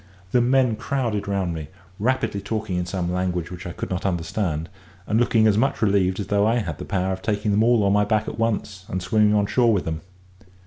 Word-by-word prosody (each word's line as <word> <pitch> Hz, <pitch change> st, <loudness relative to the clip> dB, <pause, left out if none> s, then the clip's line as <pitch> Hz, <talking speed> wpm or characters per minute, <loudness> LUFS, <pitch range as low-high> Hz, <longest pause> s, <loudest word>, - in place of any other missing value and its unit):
The 125 Hz, -, +4 dB
men 125 Hz, -2 st, +3 dB
crowded 120 Hz, -4 st, -2 dB
round 95 Hz, -3 st, -1 dB
me, 80 Hz, -2 st, -6 dB, 0.3 s
rapidly 115 Hz, -3 st, 0 dB
talking 110 Hz, -3 st, -3 dB
in 90 Hz, 0 st, -2 dB
some 90 Hz, -1 st, -2 dB
language 90 Hz, -2 st, -2 dB
which 90 Hz, +1 st, -7 dB
I -, -, -5 dB
could -, -, -6 dB
not 90 Hz, -, -2 dB
understand, 85 Hz, -3 st, -1 dB, 0.4 s
and 110 Hz, +3 st, +1 dB
looking 115 Hz, -2 st, +3 dB
as 105 Hz, -1 st, +4 dB
much 135 Hz, +3 st, +1 dB
relieved 100 Hz, -3 st, +2 dB
as 100 Hz, -, -2 dB
though 100 Hz, +2 st, +2 dB
I 115 Hz, -, +2 dB
had 95 Hz, -11 st, -2 dB
the -, -, -6 dB
power 95 Hz, 0 st, -1 dB
of 95 Hz, -, -6 dB
taking 105 Hz, 0 st, -1 dB
them 105 Hz, +1 st, +3 dB
all 120 Hz, -2 st, +4 dB
on 100 Hz, 0 st, +3 dB
my 105 Hz, 0 st, +4 dB
back 110 Hz, 0 st, 0 dB
at 110 Hz, -, -5 dB
once, 105 Hz, -4 st, -1 dB
and 95 Hz, -, -3 dB
swimming 105 Hz, +3 st, +3 dB
on 105 Hz, -1 st, +3 dB
shore 115 Hz, +3 st, +3 dB
with 100 Hz, -4 st, 0 dB
them. 80 Hz, -1 st, -3 dB
100 Hz, 230 wpm, -23 LUFS, 90-110 Hz, 0.4 s, The